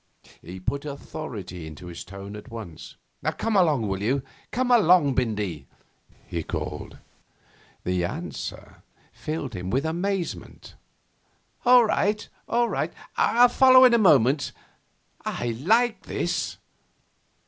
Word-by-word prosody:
He 90 +3 -9
put 140 +9 -2
authority 115 - -7
into 80 +3 -10
his 85 -1 -7
tone 100 +2 -9
at 105 +4 -10
once. 110 -9 -9 0.4
'Come 225 -1 -1
along, 150 - +3
will 95 0 -2
you; 130 +6 0 0.3
come 250 +1 0
along, 180 - +5
Bindy!' 105 - -2 0.6
he 85 - -3
called. - - -5 0.9
The 90 -1 0
answer 85 -2 -6 0.3
filled 150 -5 -4
him 90 -1 -5
with 135 +8 0
amazement. 180 +3 -3 0.9
'All 245 -1 +7
right, 210 0 0 0.2
all 240 0 +2
right. - - -2 0.2
I'll 245 +1 +5
follow 260 +1 +7
in 250 - +6
a 235 - +5
moment. 145 - +4 0.7
I 120 - -3
like 225 - +2
this. - - -2
140 Hz, 120 wpm, -25 LUFS, -, 0.9 s, All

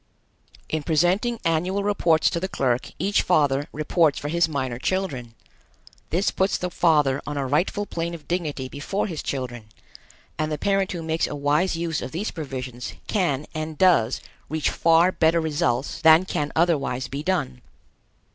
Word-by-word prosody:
In 155 - -2
presenting 180 +10 +1
annual 180 +5 +1
reports 175 -6 +2
to 170 - -1
the 190 - -2
clerk 125 -8 -1
each 200 +5 +2
father 145 -5 +2
reports 155 0 +2
for 145 - -4
his 170 +1 +2
minor 130 -5 -3
children. 130 -10 -2 0.7
This 180 +5 +1
puts 190 +1 +1
the 180 0 -3
father 150 -6 +3
on 145 -1 -3
a 140 - -1
rightful 165 +9 0
plane 170 -2 -3
of 150 -4 -13
dignity 155 -7 -2
before 145 +9 -3
his 165 -7 -4
children, 125 -4 -4 0.7
and 155 0 -1
the 150 - -1
parent 195 +3 +1
who 170 -2 -5
makes 160 0 0
a - - -5
wise 150 +6 +1
use 165 -2 -2
of - - -6
these 195 +7 -2
provisions 130 -5 -6
can 155 -9 0
and 155 0 -4
does 150 -11 +3 0.3
reach 155 0 0
far 165 +2 +4
better 165 -1 +3
results 145 -6 -1
than 160 +2 +7
can 150 -5 -2
otherwise 145 -6 +1
be 140 +3 -5
done. 150 -8 -1
160 Hz, 165 wpm, -24 LUFS, 140-175 Hz, 0.7 s, than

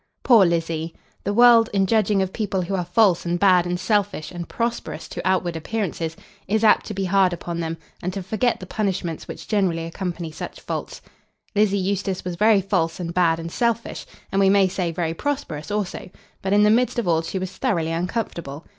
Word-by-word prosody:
Poor 225 -7 +6
Lizzie! 165 -1 -2 0.3
The 205 - 0
world, 235 -1 +7
in 195 -1 +3
judging 205 -1 +2
of 190 - -5
people 200 -4 -1
who 185 +3 -4
are 185 -2 0
false 195 -2 +3
and 175 0 -1
bad 180 -2 +4
and 175 0 -2
selfish 200 -2 0
and 175 -1 -7
prosperous 235 0 -3
to - - -5
outward 180 -2 +1
appearances, 165 -2 -3 0.3
is 215 +3 +1
apt 220 - +4
to 210 - -5
be 195 0 -1
hard 185 -1 +3
upon 170 0 -5
them, 165 0 -3 0.2
and 180 - -2
to 195 -1 -4
forget 220 +6 0
the 185 - -8
punishments 185 -5 -3
which - - -8
generally 185 -6 0
accompany 170 -1 -5
such - - -7
faults. - - -5 0.5
Lizzie 205 -1 +3
Eustace 195 -1 -2
was 180 -1 -3
very 210 +2 +4
false 180 -4 -1
and 170 -1 -4
bad 170 -2 +3
and 165 0 -6
selfish, 235 +1 -1 0.2
and, 195 - +1
we 195 - +5
may 195 -1 +5
say, 180 -2 -2
very 165 -1 -2
prosperous 165 - -4
also; 205 -3 -3 0.3
but 190 - -2
in 205 +1 +5
the 210 - +5
midst 245 +3 +2
of 235 - -1
all 165 -1 +3
she 165 +4 -4
was 185 0 -5
thoroughly 165 -5 0
uncomfortable. 170 -4 -3
185 Hz, 200 wpm, -23 LUFS, 170-205 Hz, 0.5 s, world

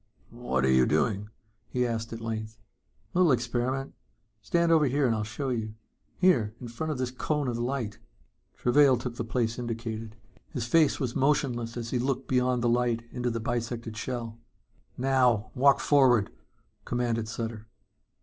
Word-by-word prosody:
"What 115 - -1
are 65 - +3
you 65 -1 +5
doing?" 105 -1 0 0.4
he 125 0 0
asked 115 -1 -3
at 115 0 -6
length. 110 -1 -4 0.6
"Little 180 -3 +4
experiment. 125 +2 -1 0.5
Stand 170 +5 +1
over 160 -2 +5
here 140 +2 +1
and 120 - +3
I'll 110 - -1
show 115 +6 -4
you. 110 -3 -3 0.4
Here, 120 - +3
in 120 - -7
front 155 +7 -4
of 150 - -3
this 125 -1 -2
cone 145 +2 -1
of 120 -1 -2
light." 120 -3 -2 0.6
Travail 135 +1 +4
took 120 0 -5
the - - -2
place 115 0 -1
indicated. 115 -2 -5 0.3
His 125 -6 -3
face 155 +4 +3
was 125 -4 -2
emotionless 130 -4 0
as 115 -1 -5
he 125 - 0
looked 130 +1 -1
beyond 125 -1 +1
the - - +3
light 120 -1 +1
into 125 -1 -2
the 115 -1 -2
bisected 115 -1 -3
shell. 115 -1 -5 0.6
"Now 125 -5 +2
walk 140 +2 +4
forward," 130 -7 +4 0.5
commanded 120 -2 -1
Sutter. 115 -1 -5
120 Hz, 160 wpm, -28 LUFS, 115-130 Hz, 0.6 s, you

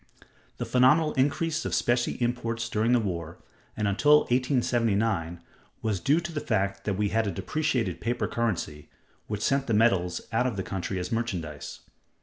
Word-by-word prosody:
The - - -3
phenomenal 150 +5 +4
increase 155 +4 0
of - - -1
specie 120 0 +1
exports 120 -1 -1
during 115 0 +1
the 125 - +5
war, 85 -5 -4 0.4
and 105 -1 0
until 145 +9 +5
1879, 115 - 0 0.4
was 105 -4 0
due 145 - +3
to 170 0 -5
the 155 - -3
fact 100 -4 -1
that 100 - 0
we 105 0 +1
had 110 0 +1
a - - -1
depreciated 130 - -1
paper 120 +2 -1
currency, 90 -10 -3 0.4
which 105 0 -3
sent 135 0 +1
the 115 - +1
metals 95 -6 +2
out 125 +3 +2
of 115 -5 -3
the 95 - -2
country 95 +1 -4
as 90 0 -4
merchandise. 90 -11 -4
115 Hz, 165 wpm, -27 LUFS, 100-125 Hz, 0.4 s, the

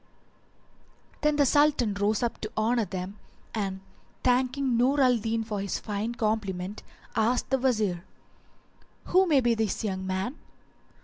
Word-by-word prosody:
"[FN#384] - - -31
Then 300 0 +3
the 290 -1 +4
Sultan 290 -6 +3
rose 205 +3 0
up 235 - -2
to 215 - -5
honour 225 +1 +2
them, 190 +2 -6 0.3
and 195 -3 -3 0.4
thanking 255 +1 +2
Nur 260 +5 +3
al 250 -3 +5
Din 225 +1 -1
for 210 -2 -3
his 200 - -2
fine 215 +3 -3
compliment, 210 -3 -2 0.3
asked 240 +4 +1
the 265 - +3
Wazir, 215 -9 +1 1.1
"Who 375 +1 +5
may 290 -5 +4
be 240 -1 +3
this 220 -2 -1
young 190 -3 -3
man?" 190 +9 -2
225 Hz, 145 wpm, -27 LUFS, 200-255 Hz, 1.1 s, al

